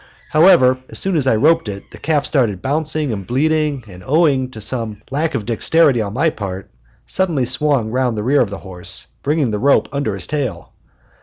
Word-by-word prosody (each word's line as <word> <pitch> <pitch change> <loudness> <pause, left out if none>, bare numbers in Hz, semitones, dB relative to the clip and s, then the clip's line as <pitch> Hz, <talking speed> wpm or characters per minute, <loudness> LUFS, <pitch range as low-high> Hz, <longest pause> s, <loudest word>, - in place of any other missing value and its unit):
However, 130 -6 +5
as - - -3
soon 190 -2 +1
as 140 -4 +1
I 130 - +4
roped 155 +2 +2
it, 100 -1 -8
the - - -12
calf 150 -2 0
started 115 - +1
bouncing 150 -1 -1
and 100 -3 -6
bleating, 150 0 0
and, 90 -2 -12
owing 140 - +2
to 115 - -10
some 110 -2 -3
lack 155 +4 -1
of 105 - -3
dexterity 125 +2 +2
on 105 0 -4
my 155 +4 +2
part, 95 - -7 0.3
suddenly 170 -9 0
swung 125 -3 +1
round 125 -2 0
the 105 - -2
rear 140 +5 +3
of 115 - 0
the 100 - -6
horse, 90 -2 -2 0.2
bringing 145 -4 0
the 105 - -2
rope 140 +4 +3
under 140 -8 -2
his 95 - -5
tail. 145 -6 -4
130 Hz, 200 wpm, -18 LUFS, 110-150 Hz, 0.3 s, However